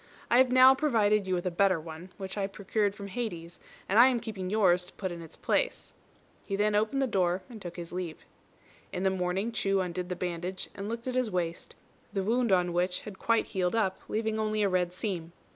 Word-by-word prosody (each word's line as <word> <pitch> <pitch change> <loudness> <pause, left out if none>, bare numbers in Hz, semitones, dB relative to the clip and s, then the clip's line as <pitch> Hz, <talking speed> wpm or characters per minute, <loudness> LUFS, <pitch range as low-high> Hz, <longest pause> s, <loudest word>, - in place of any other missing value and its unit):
I 240 - +6
have 260 -1 +5
now 255 +1 +8
provided 215 -8 +2
you 185 - +1
with 175 +1 -3
a 180 - 0
better 185 0 +3
one, 160 +3 -9
which 190 -1 -6
I 200 -2 -1
procured 200 +1 -1
from 200 - -7
Hades, 185 -6 -5 0.3
and 205 +4 +4
I 245 - +9
am 250 -2 +2
keeping 205 -6 -5
yours 185 -4 +3
to - - -13
put 190 -3 -4
in 170 -1 -7
its 165 -1 -11
place." - - -1 0.5
He 195 - -3
then 210 +1 +2
opened 220 +6 +1
the - - +3
door 185 -5 +1
and 220 -3 -10
took 175 -2 -7
his 170 -1 -7
leave. 175 -3 -5 0.7
In 180 - -3
the 190 - +3
morning 190 +4 -1
Chu 195 -3 +1
undid 180 0 -3
the 180 - -2
bandage, 180 +1 -4
and 200 +2 -5
looked 230 +2 -5
at 255 - -1
his 255 -2 +1
waist, 170 -3 -3 0.4
the 195 -2 0
wound 235 +2 +1
on 180 -2 +3
which 180 +1 0
had 205 -3 -10
quite 230 -1 +2
healed 185 -1 0
up, 195 -4 0
leaving 220 0 -1
only 215 -1 0
a 200 - +3
red 180 -1 +1
seam. 180 -3 -4
195 Hz, 225 wpm, -29 LUFS, 180-220 Hz, 0.7 s, I